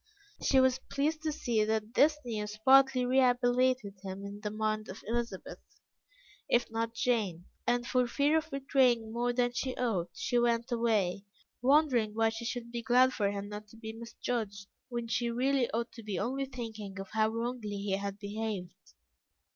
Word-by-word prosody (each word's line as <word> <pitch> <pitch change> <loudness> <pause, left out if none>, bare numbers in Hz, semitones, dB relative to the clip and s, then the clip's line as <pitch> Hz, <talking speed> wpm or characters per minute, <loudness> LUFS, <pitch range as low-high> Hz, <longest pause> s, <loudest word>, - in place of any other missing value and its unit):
She 265 - +4
was 260 0 +4
pleased 305 +3 0
to 315 -1 -1
see 235 -7 0
that 220 +1 -1
this 300 +3 +5
news 210 -2 -4
partly 265 -1 +6
rehabilitated 250 -4 +2
him 195 0 -6
in 200 +1 -7
the 210 - -2
mind 215 0 -2
of 190 - -8
Elizabeth, 235 +2 -3 0.9
if 240 -1 +2
not 225 0 -1
of - - -30
Jane; 210 -10 0 0.2
and 240 0 +2
for 250 0 +2
fear 285 +5 +2
of 320 0 0
betraying 255 -5 +2
more 240 +1 +1
than 245 0 +1
she 255 +1 -2
ought, 210 -9 0
she 245 -2 +1
went 235 +1 +1
away, 210 -5 +1 0.4
wondering 255 -6 +3
why 225 0 +3
she 225 +1 -6
should 235 -1 -4
be 235 0 -3
glad 250 +3 +4
for 200 -2 +1
him 200 0 -4
not 210 0 -7
to 225 - -16
be 220 -1 -7
misjudged, 225 -3 -4 0.2
when 240 -1 -3
she 235 +1 0
really 255 +1 +1
ought 230 +1 -2
to 230 - -10
be 210 -3 -4
only 265 +5 -1
thinking 220 -6 -7
of 195 - -7
how 220 0 +2
wrongly 230 -2 -3
he 200 0 -3
had 200 0 -4
behaved. 205 -2 -4
235 Hz, 180 wpm, -31 LUFS, 215-250 Hz, 0.9 s, partly